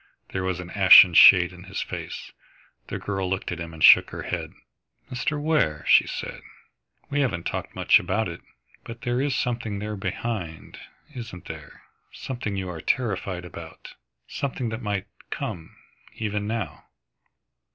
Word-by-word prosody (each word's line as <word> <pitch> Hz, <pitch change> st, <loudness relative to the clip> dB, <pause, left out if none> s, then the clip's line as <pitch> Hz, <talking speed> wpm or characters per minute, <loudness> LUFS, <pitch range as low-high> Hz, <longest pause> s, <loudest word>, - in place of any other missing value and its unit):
There 95 Hz, -, -3 dB
was 95 Hz, -1 st, -2 dB
an 90 Hz, 0 st, -8 dB
ashen 95 Hz, -2 st, +8 dB
shade 90 Hz, +1 st, +8 dB
in 90 Hz, +1 st, -13 dB
his 100 Hz, +1 st, -5 dB
face. -, -, -6 dB, 0.6 s
The -, -, -4 dB
girl 95 Hz, -2 st, -3 dB
looked 95 Hz, -1 st, -2 dB
at 90 Hz, -, -5 dB
him 85 Hz, 0 st, -6 dB
and 80 Hz, -1 st, -6 dB
shook -, -, +8 dB
her -, -, -7 dB
head. -, -, -4 dB, 0.6 s
"Mr. 145 Hz, +5 st, -2 dB
Ware," 150 Hz, -, +1 dB
she -, -, +6 dB
said, -, -, -6 dB, 0.7 s
"we 145 Hz, -, 0 dB
haven't 120 Hz, -12 st, -1 dB
talked -, -, -4 dB
much -, -, +5 dB
about 95 Hz, +5 st, -1 dB
it, 85 Hz, -, -8 dB, 0.4 s
but 115 Hz, 0 st, -10 dB
there 120 Hz, +1 st, 0 dB
is 140 Hz, -2 st, 0 dB
something 115 Hz, -4 st, -2 dB
there 105 Hz, +1 st, -4 dB
behind, 95 Hz, -5 st, -5 dB, 0.3 s
isn't 115 Hz, -8 st, -8 dB
there, -, -, -10 dB, 0.3 s
something 120 Hz, -6 st, -5 dB
you 95 Hz, -1 st, -3 dB
are 85 Hz, -3 st, -6 dB
terrified 95 Hz, -7 st, -2 dB
about, 90 Hz, -, -11 dB, 0.3 s
something 130 Hz, -3 st, -3 dB
that 110 Hz, +2 st, -5 dB
might 100 Hz, -3 st, -2 dB, 0.2 s
come, 80 Hz, -2 st, -6 dB, 0.4 s
even 105 Hz, -1 st, -3 dB
now?" 105 Hz, -9 st, -4 dB
100 Hz, 155 wpm, -25 LUFS, 90-115 Hz, 0.7 s, ashen